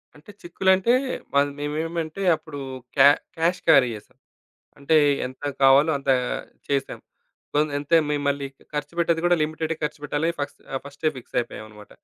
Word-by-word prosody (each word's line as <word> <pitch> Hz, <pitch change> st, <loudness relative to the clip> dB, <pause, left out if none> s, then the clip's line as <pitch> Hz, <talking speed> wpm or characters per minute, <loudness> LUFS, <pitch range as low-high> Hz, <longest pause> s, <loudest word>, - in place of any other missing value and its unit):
అంటే 150 Hz, +8 st, -14 dB
చిక్కులంటే 190 Hz, +5 st, +2 dB, 0.4 s
వల్ 140 Hz, 0 st, +3 dB
మేమేమంటే, 160 Hz, +4 st, -3 dB
అప్పుడు 155 Hz, -2 st, -9 dB, 0.4 s
క్యా 140 Hz, -, +9 dB, 0.3 s
క్యాష్ 170 Hz, +3 st, +1 dB
క్యారీ 135 Hz, -6 st, +6 dB
జేశాం. 105 Hz, -, -15 dB, 0.6 s
అంటే 145 Hz, +3 st, +2 dB, 0.3 s
ఎంత 130 Hz, +2 st, -12 dB, 0.2 s
కావాలో 135 Hz, +4 st, +6 dB
అంత 140 Hz, 0 st, -1 dB, 0.6 s
చేసాం. 140 Hz, -1 st, -2 dB, 0.5 s
సో, -, -, +1 dB, 0.2 s
అంతే 145 Hz, +4 st, +2 dB
మేం 150 Hz, -1 st, 0 dB
మళ్ళీ 140 Hz, 0 st, -1 dB, 0.3 s
ఖర్చుపెట్టేది 165 Hz, +3 st, -1 dB
గూడా 175 Hz, 0 st, +4 dB
లిమిటెడ్‌గా 155 Hz, +1 st, -2 dB
ఖర్చుపెట్టాలి 150 Hz, +1 st, -2 dB
ఫస్ 145 Hz, -, -3 dB, 0.2 s
ఆహ్, 135 Hz, -, -2 dB
ఫస్టె 140 Hz, +2 st, -2 dB
ఫిక్సయిపోయమన్నమాట. 110 Hz, -4 st, -6 dB
150 Hz, 130 wpm, -24 LUFS, 140-165 Hz, 0.6 s, క్యా